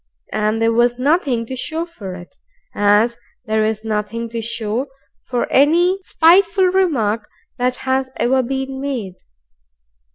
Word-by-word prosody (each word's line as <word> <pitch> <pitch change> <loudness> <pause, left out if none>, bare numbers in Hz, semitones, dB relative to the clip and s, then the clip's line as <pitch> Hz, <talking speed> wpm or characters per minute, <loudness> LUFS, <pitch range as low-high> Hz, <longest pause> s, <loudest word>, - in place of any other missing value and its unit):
And 215 +1 0
there 225 0 +2
was 240 +1 +2
nothing 265 -4 +1
to 260 - -6
show 315 +6 -3
for 205 - -8
it, 175 -1 -12 0.4
as 210 +3 +3 0.3
there 220 -1 +1
is 215 0 -1
nothing 220 +1 -3
to 230 0 -4
show 225 +3 -3 0.4
for 245 -2 0
any 345 +7 +4
spiteful 370 +3 +4
remark 260 - 0 0.3
that 250 0 +1
has 260 0 0
ever 260 +2 +2
been 265 +1 -4
made. 235 -10 -4
245 Hz, 135 wpm, -19 LUFS, 220-280 Hz, 0.4 s, any